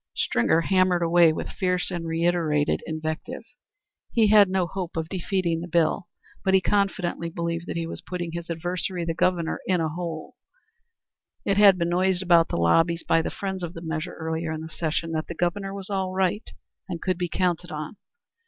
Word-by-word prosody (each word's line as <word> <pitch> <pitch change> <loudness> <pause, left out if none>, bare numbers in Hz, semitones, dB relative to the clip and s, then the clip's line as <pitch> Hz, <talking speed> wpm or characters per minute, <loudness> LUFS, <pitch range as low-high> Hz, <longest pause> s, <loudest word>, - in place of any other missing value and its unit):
Stringer 160 +7 +2
hammered 185 -1 +2
away 170 -1 +5
with 155 - -4
fierce 180 -1 -1
and 170 -2 -3
reiterated 165 -3 +1
invective. 160 +10 -4 0.7
He 220 -3 +4
had 205 -2 +7
no 185 -1 +1
hope 180 -1 -5
of 160 -1 -2
defeating 180 -3 -1
the 175 - -5
bill, 170 +2 +1 0.4
but 190 -1 +3
he - - +6
confidently 190 -4 0
believed 170 0 -3
that - - -4
he 165 - -1
was 165 - -7
putting 175 -2 -5
his 170 0 -6
adversary, 175 +1 -2
the 165 - -1
Governor, 175 -1 0
in 185 -2 +2
a 160 -1 0
hole. 165 -1 -6 1.1
It 200 - +1
had 200 -2 +7
been 170 -1 0
noised 185 +1 +1
about 170 -2 +5
the - - -3
lobbies 165 - +3
by 165 - +4
the - - -3
friends 190 -1 -4
of 175 0 -5
the 165 - -7
measure 160 +2 -4
earlier 160 0 -3
in 160 0 -4
the 160 - -7
session 165 0 -2
that 160 -1 -2
the 170 - -6
Governor 195 +4 -1
was 195 0 -7
all 190 -1 -1
right 190 +3 0 0.4
and 170 -2 -3
could 185 0 -1
be 175 -1 -1
counted 175 -1 -1
on. 155 +5 -6
175 Hz, 190 wpm, -25 LUFS, 165-185 Hz, 1.1 s, had